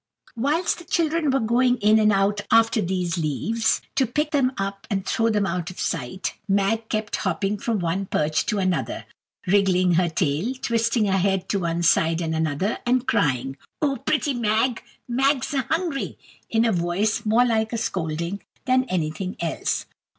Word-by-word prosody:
Whilst 295 +11 0
the - - -10
children 330 -2 0
were 270 0 +2
going 245 +2 +2
in 215 0 +4
and 215 0 +4
out 200 +1 +1
after 225 0 +4
these 180 -1 -1
leaves, 220 +9 0
to 270 -2 +2
pick 300 +5 -1
them 270 -3 +2
up 195 0 -4
and 195 -3 -1
throw 225 +3 +1
them 210 -2 +1
out 175 -2 -2
of 185 - -10
sight, 190 - -3
Mag 200 +3 +1
kept 215 -1 -2
hopping 195 +2 -1
from 230 0 -1
one 185 +2 -2
perch 155 -1 0
to 210 - 0
another, 185 -3 -1 0.4
wriggling 185 -2 +3
her 170 +1 +2
tail, 165 - -1
twisting 230 -2 +1
her 195 -1 +2
head 190 0 0
to 200 - +1
one 170 -1 -1
side 165 0 +3
and 165 -2 -2
another, 160 +6 -1
and 250 +1 +1
crying, 135 -2 0 0.2
"Oh, 280 -3 0
pretty 295 -2 0
Mag!" 230 +1 +1 0.3
"Mag's 270 +3 +1
a 270 - +2
hungry," 325 -4 -2 0.3
in 225 +1 +2
a 230 - +3
voice 180 +4 0
more 225 +3 +4
like 220 -2 +1
scolding 170 -1 -3 0.2
than 255 0 +3
anything 180 -2 -3
else. 165 -1 -2
205 Hz, 170 wpm, -23 LUFS, 180-240 Hz, 0.4 s, in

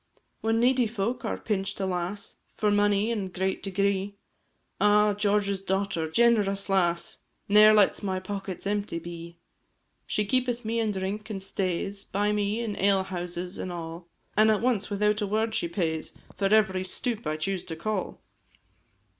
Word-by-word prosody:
When 225 +1 +1
needy 250 0 +3
folk 220 +2 -2
are - - -1
pinch'd, 195 -2 -2
alas! 190 +1 -3 0.2
For 210 -1 +2
money 205 +1 +3
in 210 -4 -1
a - - -6
great 190 +1 -2
degree; 200 0 0 0.6
Ah, 210 0 +5
George's 200 -1 +1
daughter 190 -4 -1
generous 205 -1 +2
lass 175 -3 +1 0.3
Ne'er 210 +1 +8
lets 210 -2 +4
my 190 -2 -1
pockets 195 0 -6
empty 205 -3 -1
be; 170 0 -8 0.7
She 210 - 0
keepeth 245 0 0
me 230 +1 0
in 220 -2 +1
drink, 200 +3 -4
and 195 -3 -5
stays 195 +1 -2
By 205 +2 0
me 210 +2 0
in 220 -3 -3
ale 195 0 +3
houses 180 -1 -5
and 185 - -4
all, 170 0 -7 0.3
An' 215 +1 +5
at 215 -2 +3
once, 235 -4 +1
without 210 +1 +1
a 205 - 0
word, 220 +2 0
she 170 - 0
pays 165 -3 -3 0.2
For 195 - -1
every 190 -4 +3
stoup 225 +4 -3
I 155 0 -1
choose 185 +3 -2
to 165 -3 -6
call! 195 +3 -3
200 Hz, 165 wpm, -27 LUFS, 185-210 Hz, 0.7 s, Ne'er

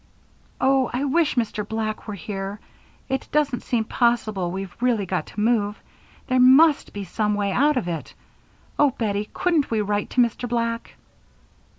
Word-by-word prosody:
"Oh, 265 -1 +3
I 250 +3 -2
wish 300 +2 +2
Mr. 225 -3 -1
Black 215 +1 -4
were 210 - -4
here. 195 +2 -5 0.5
It 265 0 -2
doesn't 285 -5 +1
seem 235 -3 0
possible 220 -6 0
we've 190 0 -6
really 235 -5 +1
got 185 0 -2
to - - -8
move. 210 -2 +1 0.5
There 255 -1 +1
must 275 +5 +6
be 205 - -5
some 210 +3 -1
way 200 -1 0
out 285 +6 +3
of 225 - -1
it. 165 -2 -5 0.6
Oh, 290 - +6
Bettie, 210 -2 -1
couldn't 335 -6 +1
we 225 - 0
write 205 0 -1
to 250 - +2
Mr. 240 +1 0
Black?" 230 -1 -2
225 Hz, 165 wpm, -23 LUFS, 205-255 Hz, 0.6 s, must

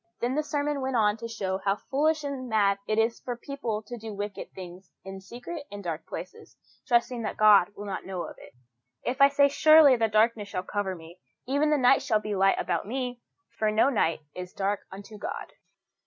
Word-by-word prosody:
Then 245 +2 -1
the 300 - +1
sermon 295 -1 -2
went 260 0 -2
on 210 -2 +3
to 230 +1 -6
show 195 -4 -3
how 195 0 +1
foolish 300 +7 0
and 270 -3 -5
mad 200 -3 +2
it 215 - 0
is 225 +1 +1
for 245 -1 -5
people 240 -5 -4
to 240 +2 -8
do 220 -1 -7
wicked 205 0 -6
things 180 0 -10
in 195 0 -8
secret 250 - -8
and 205 0 -7
dark 165 -2 -5
places, - - -9 0.3
trusting 240 -1 +2
that 215 - -4
God 210 -4 +6
will 205 - -8
not 195 -2 -4
know 185 -2 -4
it. - - -16 0.5
"If 260 +3 -2
I 275 - +10
say, 280 0 +4
Surely 305 -1 +7
the 225 -2 +1
darkness 215 0 +2
shall 185 -2 -3
cover 195 -1 -3
me, 170 +1 -13 0.3
even 285 +4 +1
the 300 - +3
night 265 0 +5
shall 215 - +1
be 210 0 -4
light 195 0 +3
about 175 +1 -2
me," 250 0 -4 0.4
for 215 - +2
no 220 +6 +3
night 165 - +1
is 180 0 -8
dark 200 +1 -1
unto 205 +2 -10
God. - - -6
220 Hz, 205 wpm, -27 LUFS, 195-260 Hz, 0.5 s, I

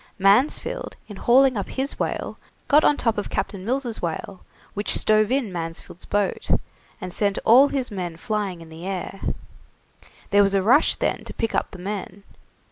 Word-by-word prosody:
Mansfield, 200 +9 +2
in 205 - -9
hauling 255 +5 +4
up 200 -3 -3
his 270 +1 -2
whale - - -3 0.3
got 300 +2 +5
on 290 - +4
top 230 -3 0
of 205 - -5
Captain 195 -2 -3
Mills' 245 0 -2
whale, 175 +2 -4 0.3
which 205 +1 +1
stove 215 +1 +3
in 255 -8 0
Mansfield's 165 0 -7
boat, 205 -1 -1 0.5
and 185 -4 -7
sent 200 -2 0
all 255 +5 +7
his 265 -4 -2
men 175 -4 -5
flying 200 -3 -3
in 165 - -12
the 165 +3 -9
air. 195 0 -5 1.1
There 205 0 +6
was 200 0 +3
a 195 - +2
rush 255 +9 +4
then - - -2
to - - -8
pick 225 - -2
up - - 0
the - - -11
men. 200 +1 -6
205 Hz, 175 wpm, -23 LUFS, 190-240 Hz, 1.1 s, all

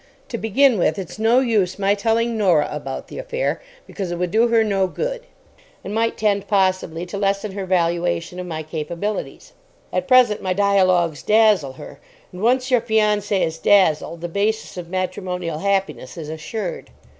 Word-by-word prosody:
To 235 - -3
begin 230 +1 +3
with, 175 - +1
it's 190 +2 -7
no 230 +4 +4
use 210 -8 +1
my 200 0 +2
telling 230 +2 0
Norah 180 -9 +3
about 140 -3 -6
the - - -8
affair, - - -2 0.2
because 195 -4 -5
it 175 - -3
would 180 0 -2
do 225 +3 +4
her 230 -1 +3
no 195 -3 +1
good, - - -4 0.6
and 200 - -6
might 230 +1 0
tend 205 -2 0
possibly 185 -4 0
to 190 +3 -6
lessen 200 +1 0
her 195 -1 -5
valuation 170 - 0
of 180 - -5
my 160 -2 -4
capabilities. 170 - -5 0.4
At - - -1
present, 250 -5 +5
my 185 -1 -1
dialogues 185 -5 +2
dazzle 210 -10 +3
her; - - -11 0.3
and 180 - -9
once 255 +3 +2
your 250 -2 +4
fiancée 210 -3 +1
is 160 0 -5
dazzled 170 -4 +3
the 175 - -3
basis 210 +5 -2
of 175 -2 -7
matrimonial 180 -3 -3
happiness 190 -9 -2
is 155 -2 -6
assured. 170 +5 -5
195 Hz, 170 wpm, -21 LUFS, 175-220 Hz, 0.6 s, present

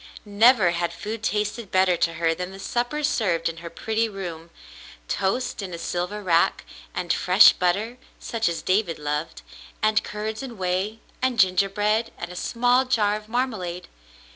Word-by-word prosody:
Never 210 -2 +5
had 170 0 -2
food 215 +1 -6
tasted 210 0 -2
better 185 -1 +3
to 165 0 0
her 165 0 +1
than 180 +2 -5
the 195 - -10
supper 245 +8 -2
served 180 - +1
in 165 0 -4
her 170 0 -8
pretty 225 +5 -1
room, 170 -5 -7 0.3
— - - -18
toast 220 +5 -1
in 185 -3 -5
a - - -6
silver 180 +5 -3
rack, 170 -3 +2 0.3
and 175 -2 0
fresh 185 +3 +6
butter, 205 +7 -1 0.2
such 225 -4 -1
as 165 -2 -4
David 185 -3 +1
loved, 150 +2 -4 0.4
and 215 0 +2
curds 215 +2 -5
and 250 -4 -8
whey, 190 +4 -2 0.2
and 255 -3 0
gingerbread, 205 +4 +2
and 175 0 -6
a - - -9
small 245 +6 +2
jar 210 -5 +2
of 215 0 -9
marmalade. 215 -8 -2
200 Hz, 165 wpm, -24 LUFS, 175-225 Hz, 0.4 s, fresh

